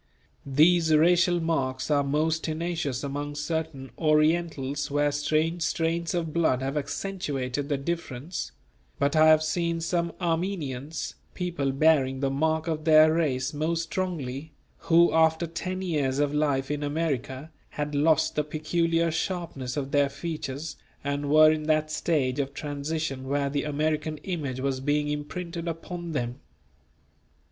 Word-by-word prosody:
These 160 +4 +4
racial 175 +2 +4
marks 140 -5 -1
are 145 -1 +3
most 155 +3 0
tenacious 160 -5 -2
among 145 +1 -4
certain 150 -4 -3
Orientals 155 -2 +1
where 145 +1 +2
strange 155 +4 0
strains 165 +1 0
of 165 -3 -2
blood 145 -6 +2
have 135 +2 -2
accentuated 145 -4 -3
the 145 - +1
difference; 165 0 -4 0.5
but 140 +2 +1
I 155 0 +6
have 155 0 +6
seen 170 +1 0
some 170 +1 -1
Armenians, 165 -5 -2 0.2
people 170 -7 -1
bearing 135 -2 +3
the 135 0 0
mark 160 +3 0
of 155 -2 -2
their 155 0 +7
race 135 -6 0
most 165 +3 -1
strongly, 160 -6 -4 0.2
who 170 0 +4
after 160 +1 +3
ten 185 +3 -4
years 145 -7 0
of 145 0 +1
life 145 -2 +1
in 150 0 -2
America, 145 -1 -2 0.2
had 150 0 -4
lost 150 +1 +3
the 150 - 0
peculiar 165 +2 0
sharpness 160 -7 -3
of 140 -1 -3
their 145 -1 +3
features 145 0 -5 0.3
and 140 0 -2
were 155 +1 +7
in 155 -1 -2
that 155 0 +2
stage 145 -5 0
of 140 0 -2
transition 145 -2 -3
where 140 0 0
the 145 0 -1
American 155 +1 -1
image 145 -9 -3
was 135 -1 -1
being 145 +2 0
imprinted 170 +3 -4
upon 170 +1 -5
them. 120 -3 -3
155 Hz, 140 wpm, -27 LUFS, 140-165 Hz, 0.5 s, their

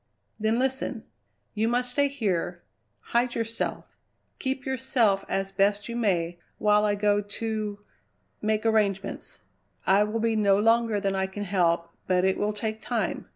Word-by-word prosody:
"Then 220 +2 +1
listen! 260 -3 -1 0.5
You 220 +2 +1
must 245 +1 0
stay 285 +2 +3
here, 185 -10 -2 0.5
hide 240 +1 +2
yourself, 230 0 -3 0.4
keep 265 0 -2
yourself 245 -7 +1
as 195 0 -1
best 200 +1 +1
you 235 - -5
may, 175 -7 0 0.2
while 210 0 +3
I 205 -1 +2
go 205 0 +2
to 210 0 -3 0.6
make 215 +1 0
arrangements. 205 -4 0 0.4
I 195 +2 +5
will 215 +2 -2
be 225 0 +1
no 200 -2 +4
longer 225 0 +3
than 195 -1 0
I 190 0 0
can 205 +2 -6
help, 170 -3 +1 0.2
but 185 0 +3
it 190 - +1
will 210 +1 +1
take 215 +1 -3
time. - - -2
210 Hz, 155 wpm, -27 LUFS, 195-230 Hz, 0.6 s, I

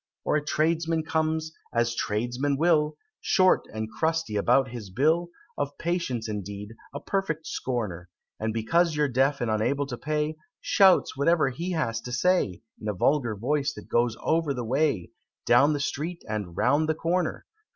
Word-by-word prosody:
Or - - +2
a 150 - +1
tradesman 160 +1 +1
comes 160 0 -1 0.2
as 115 0 +1
tradesmen 120 +6 -1
will 155 -1 +2 0.2
Short 185 -1 +3
and 110 0 -4
crusty 160 +2 -1
about 125 +5 +3
his 115 -5 -7
bill, 160 - +2 0.3
Of 145 0 -2
patience, 165 -10 -2
indeed, 105 0 -6 0.2
a 140 - -5
perfect 165 -2 -2
scorner, 105 -9 -3 0.3
And 110 +1 -1
because 155 +10 +1
you're 150 0 +2
deaf 135 +2 +1
and 120 -2 0
unable 135 +7 +1
to 125 -3 -6
pay, 150 0 -1 0.2
Shouts 190 -2 +4
whatever 150 +1 +3
he 170 +8 -4
has 115 -9 -1
to 125 - -7
say, 120 - +1 0.2
In 110 - -5
a 105 - -1
vulgar 120 +2 +1
voice, 140 +6 0
that - - -11
goes 120 -1 +1
over 160 -3 +1
the 125 -1 -3
way, 130 - 0 0.3
Down 145 +2 +5
the 145 - -1
street 155 +5 -3
and 105 -6 -4
round 145 +5 +2
the 160 - +2
corner! 175 +3 -1
140 Hz, 165 wpm, -27 LUFS, 115-160 Hz, 0.3 s, Down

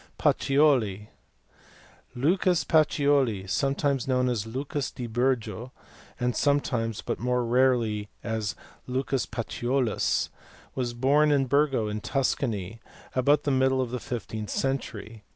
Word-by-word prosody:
Pacioli*. 125 -9 +2 1.1
Lucas 175 +6 +2
Pacioli, 140 -9 +2
sometimes 140 +3 0
known 125 -1 +2
as 110 -3 -2
Lucas 135 +4 -3
di 125 - -7
Bur 120 +3 +2
go, 120 +1 -8 0.5
and 125 -1 0
sometimes, 125 -6 0
but - - -3
more 125 0 0
rarely, 115 -4 +2
as 110 -2 -2 0.3
Lucas 130 +1 -1
Paciolus, 120 +1 -1 0.4
was 120 -2 -3
born 145 +5 +3
at 135 -2 +2
Burgo 140 -5 +2
in 105 0 -4
Tuscany 115 -6 -1 0.3
about 140 +3 +3
the 145 - 0
middle 130 0 +2
of 125 -2 -1
the 125 - -3
fifteenth 110 -3 -5
century. 115 -5 -3
125 Hz, 120 wpm, -27 LUFS, 115-140 Hz, 1.1 s, born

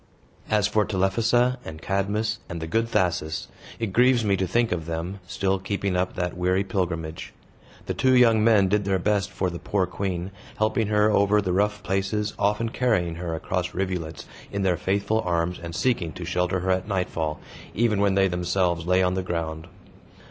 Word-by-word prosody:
As 105 -2 +3
for 105 0 +2
Telephassa, 115 +6 +1
and 80 -1 -8
Cadmus, 100 +5 -1
and 85 - -5
the 80 - -4
good 115 +7 0
Thasus, 85 -6 -1 0.3
it 110 -5 -3
grieves 125 0 +4
me 100 -1 +3
to 95 -1 -1
think 115 +5 +1
of 85 -3 -2
them, 85 +4 -4
still 95 +2 0
keeping 100 -1 -2
up 90 0 -1
that 90 -1 -2
weary 90 +2 +1
pilgrimage. 85 -5 -3 0.5
The - - -2
two 130 0 +3
young 115 -3 +5
men 110 -4 +5
did 105 +2 +1
their 95 -1 +2
best 100 0 0
for 90 - -2
the 85 - -6
poor 100 -2 0
queen, 90 0 -3 0.3
helping 110 +1 +1
her 105 0 +3
over 105 0 +4
the 95 -3 -1
rough 105 +2 0
places, 100 +3 -1
often 105 +3 +1
carrying 110 -9 +1
her 85 -2 -3
across 90 +2 -3
rivulets 90 -5 -3 0.3
in 100 -1 -2
their 95 -2 +2
faithful 100 +5 0
arms 85 -1 -1
and 85 -1 -6
seeking 95 -10 0
to 90 - -7
shelter 90 +1 0
her 95 +1 0
at 95 +1 0
nightfall, 85 -6 -2 0.4
even 105 -2 +2
when 100 -1 +3
they 95 0 +4
themselves 90 -1 0
lay 90 +1 +4
on 90 0 +2
the 95 - -1
ground. 80 -3 -4
95 Hz, 185 wpm, -25 LUFS, 90-105 Hz, 0.5 s, young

